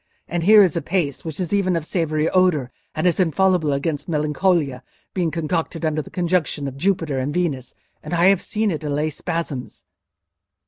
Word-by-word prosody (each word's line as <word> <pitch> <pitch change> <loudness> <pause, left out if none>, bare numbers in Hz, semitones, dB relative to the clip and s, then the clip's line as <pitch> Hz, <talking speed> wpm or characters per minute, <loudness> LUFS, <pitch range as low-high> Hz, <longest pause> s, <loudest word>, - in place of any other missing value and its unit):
And 175 +1 -2
here 210 +4 +7
is 180 -6 +1
a 170 - 0
paste 155 -3 -1
which 160 -1 -6
is 180 0 -2
even 190 -3 +2
of 165 -2 -2
savoury 160 -3 0
odour, 175 -9 +2 0.2
and 155 - -1
is 175 0 +2
infallible 180 -2 +2
against 145 +3 -2
melancholia, 150 -3 +1 0.3
being 175 -3 0
concocted 165 0 -2
under 155 0 0
the - - -12
conjunction 170 -5 -1
of 135 - -6
Jupiter 160 -3 0
and 130 +3 -2
Venus; 145 -7 -2 0.3
and 155 - -9
I 170 +1 +3
have 195 -2 +3
seen 215 -1 -1
it 160 -2 -4
allay 150 +1 -1
spasms." 150 -4 -5
165 Hz, 180 wpm, -22 LUFS, 150-180 Hz, 0.3 s, here